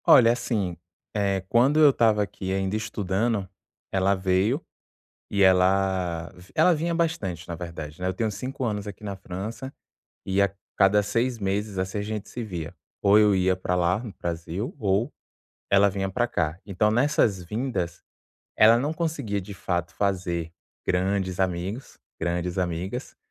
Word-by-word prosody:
Olha, 115 -2 +8
assim, 115 -7 -1 0.4
eh, 100 -2 +1
quando 130 +8 +4
eu 150 -2 +8
estava 110 -4 +3
aqui 95 -1 -5
ainda 95 +1 0
estudando, 105 -1 -1 0.4
ela 95 +1 +2
veio, 95 +7 +1 0.7
e 100 - +1
ela 95 -2 +3
vi 90 +1 -16
ela 165 +3 +5
vinha 170 +2 -1
bastante 105 - -1
na 85 - -4
verdade, 80 -3 -7
né, 90 - 0
eu 95 - 0
tenho 110 +4 -1
5 130 +5 -5
anos 105 -2 -2
aqui 105 +1 -9
na 100 -1 -4
França, 105 +8 -6 0.5
e 95 +1 +1
a 100 -1 +4 0.3
cada 100 +2 +5
6 115 +4 0
meses, 100 0 -2
assim, 95 +2 -2
a - - -1
gente 105 0 -4
se 125 - -5
via. 85 -8 -5 0.3
Ou 100 +1 +6
eu 105 -1 +5
ia 95 0 +3
pra 90 0 -2
lá, 90 +1 +2
no 110 -3 -8
Brasil 85 - -4
ou 100 +2 +1 0.6
ela 100 +1 +6
vinha 95 0 -2
pra 120 +5 +1
cá. 80 -2 -1
Então, 105 +2 +1
nessas 115 -6 +2
vindas, 90 -4 -3 0.5
ela 110 +2 +7
não 145 +5 -1
conseguia 155 -12 -2
de 100 +2 -9
fato 90 -2 -2
fazer 90 -4 -1 0.3
grandes 95 0 0
amigos, 95 +6 -2 0.2
grandes 85 +1 -1
amigas, 90 +8 -3
100 Hz, 160 wpm, -26 LUFS, 90-110 Hz, 0.7 s, Olha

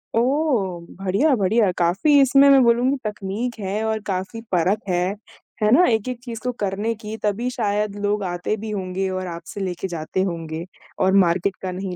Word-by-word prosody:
ओह! 235 - +1 0.2
बढ़िया, 200 +11 +2
बढ़िया, 205 -1 +2
काफ़ी 195 - +3
इसमें 275 +1 +6
मैं 275 -1 +7
बोलूँगी 245 +4 +3
तकनीक 210 +3 -3
है 205 +2 -2
और 220 0 0
काफ़ी 195 +4 -3
परख 185 +4 +2
है, 180 +2 0 0.5
है 210 0 +3
ना? 345 +9 +6
एक-एक 235 +2 0
चीज़ 235 -3 -6
को 250 - 0
करने 205 +3 -1
की 215 0 -7
तभी 215 +4 0
शायद 210 -4 -1
लोग 205 0 0
आते 180 +3 -2
भी 220 +1 -6
होंगे 190 -1 -2
और 185 0 -3
आपसे 170 +2 -7
लेके 185 0 -3
जाते 170 +1 -3
होंगे 165 -3 -4 0.3
और 190 0 +3
मार्केट 180 +3 0
का 185 - -3
नहीं 185 0 -5
205 Hz, 175 wpm, -22 LUFS, 185-230 Hz, 0.5 s, मैं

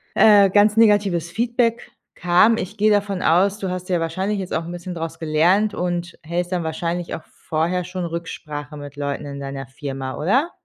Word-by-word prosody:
äh, 205 -2 +7
ganz 205 +2 +4
negatives 205 -6 +3
Feedback 235 +1 0 0.2
kam. 180 +6 +4
Ich 205 +1 -5
gehe 215 +1 +3
davon 200 -2 0
aus, 195 +5 +3
du 190 - -3
hast 180 0 -5
ja 180 -2 +1
wahrscheinlich 190 +5 -2
jetzt 185 -1 -5
auch 165 - 0
'n 170 - -6
bisschen 175 +1 -6
draus 165 0 -5
gelernt 170 +7 +2
und 175 -1 -3
hältst 175 +3 -2
dann 175 -2 -1
wahrscheinlich 170 +2 -3
auch - - -9
vorher 170 +3 -2
schon 180 0 -5
Rücksprache 155 -3 -6
mit 145 -1 -9
Leuten 140 0 -3
in 140 -1 -7
deiner 135 -1 -6
Firma, 135 -1 -6
oder? 260 - +1
175 Hz, 185 wpm, -21 LUFS, 160-200 Hz, 0.2 s, äh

